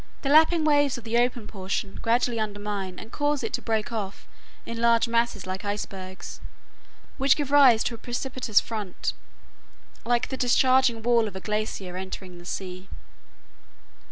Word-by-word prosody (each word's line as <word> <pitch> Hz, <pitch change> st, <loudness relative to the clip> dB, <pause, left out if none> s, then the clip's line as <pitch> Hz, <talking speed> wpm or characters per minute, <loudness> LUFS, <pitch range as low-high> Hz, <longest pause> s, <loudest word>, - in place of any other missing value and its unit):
The 275 Hz, -, 0 dB
lapping 315 Hz, +2 st, +5 dB
waves 290 Hz, -3 st, +3 dB
of 240 Hz, -, -9 dB
the 230 Hz, +1 st, +1 dB
open 245 Hz, -2 st, 0 dB
portion 195 Hz, -1 st, -4 dB
gradually 235 Hz, 0 st, +1 dB
undermine 205 Hz, -3 st, -4 dB
and 225 Hz, -, -10 dB
cause 290 Hz, -2 st, 0 dB
it 225 Hz, -, -3 dB
to -, -, -1 dB
break 220 Hz, -1 st, -1 dB
off 205 Hz, -4 st, -5 dB, 0.4 s
in 230 Hz, 0 st, -5 dB
large 235 Hz, 0 st, +4 dB
masses 230 Hz, -3 st, 0 dB
like 185 Hz, 0 st, -4 dB
icebergs, 195 Hz, -2 st, -6 dB, 0.8 s
which 275 Hz, 0 st, +5 dB
gives 285 Hz, -2 st, -3 dB
rise 265 Hz, -6 st, +7 dB
to -, -, -2 dB
a 230 Hz, -, -8 dB
precipitous 245 Hz, -2 st, 0 dB
front 210 Hz, -5 st, -4 dB, 0.9 s
like 240 Hz, 0 st, +1 dB
the 265 Hz, -, -4 dB
discharging 255 Hz, -2 st, +3 dB
wall 235 Hz, -1 st, +3 dB
of 200 Hz, -, -8 dB
a -, -, -4 dB
glacier 210 Hz, -3 st, -3 dB
entering 185 Hz, -1 st, -7 dB
the 175 Hz, -, -13 dB
sea. 185 Hz, 0 st, -6 dB
225 Hz, 155 wpm, -26 LUFS, 200-250 Hz, 0.9 s, rise